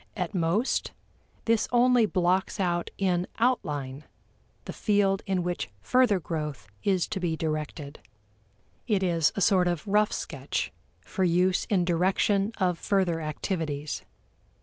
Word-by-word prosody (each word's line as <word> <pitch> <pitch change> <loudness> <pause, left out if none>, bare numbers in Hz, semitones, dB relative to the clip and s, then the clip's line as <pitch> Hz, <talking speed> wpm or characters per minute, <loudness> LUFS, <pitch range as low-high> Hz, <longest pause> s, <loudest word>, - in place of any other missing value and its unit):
At 180 -3 -2
most, 180 +7 0 0.5
this 225 -1 +2
only 245 -2 +4
blocks 185 +2 0
out 175 -2 0
in 180 -2 +1
outline 150 - -1 0.6
the - - -6
field 200 -2 +2
in 190 -2 0
which 175 -8 -3
further 220 - +3
growth 150 -5 -5 0.2
is 190 -4 +1
to 215 - -2
be 170 -3 -1
directed. 155 -2 -4 0.9
It 205 -5 +1
is 165 -4 +2
a 200 - -2
sort 185 -3 +4
of 175 +2 -2
rough 210 +1 +3
sketch - - -3 0.3
for 190 - -3
use 180 +1 +2
in 185 -4 +1
direction 195 +4 +2
of 180 -4 0
further 185 -5 +1
activities. 155 -1 -3
180 Hz, 130 wpm, -27 LUFS, 165-200 Hz, 0.9 s, only